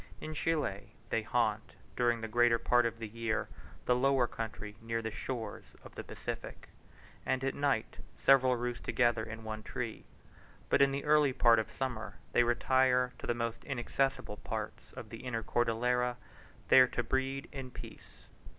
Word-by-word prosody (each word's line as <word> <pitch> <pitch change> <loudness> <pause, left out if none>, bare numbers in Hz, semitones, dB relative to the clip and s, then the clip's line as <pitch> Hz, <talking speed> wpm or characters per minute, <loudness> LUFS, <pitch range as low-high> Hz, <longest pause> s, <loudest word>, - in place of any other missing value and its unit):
In 155 - -6
Chile, 150 -11 -2 0.2
they - - +2
haunt, - - 0 0.2
during 120 -1 +2
the 110 - -3
greater 120 +1 +4
part 120 0 +3
of 115 0 -6
the 115 -1 -5
year, 115 0 -2 0.4
the 125 - +4
lower 135 0 +3
country 110 -3 -6
near 115 0 -2
the 110 -1 -4
shores 115 +1 -6
of - - -12
the - - -6
Pacific, - - -7 0.5
and 130 0 0
at 135 - 0
night 140 -6 0 0.2
several 130 -2 +5
roost 120 0 -3
together 120 -2 +2
in 110 0 -7
one 110 0 -5
tree; 115 0 -5 0.6
but - - +4
in 140 0 +5
the 140 +1 -3
early 150 -2 +4
part 115 -2 +5
of 110 - -2
summer, 125 -5 -4 0.2
they - - +4
retire 125 +1 +3
to - - -7
the 120 - +1
most 115 -1 -3
inaccessible 135 -3 -1
parts - - -6
of - - -9
the - - -7
inner 115 -3 -4
Cordillera, 120 +2 +1 0.5
there 130 -1 +8
to 120 - -2
breed 130 +3 -1
in 135 -2 -6
peace. - - -12
120 Hz, 170 wpm, -32 LUFS, 115-130 Hz, 0.6 s, there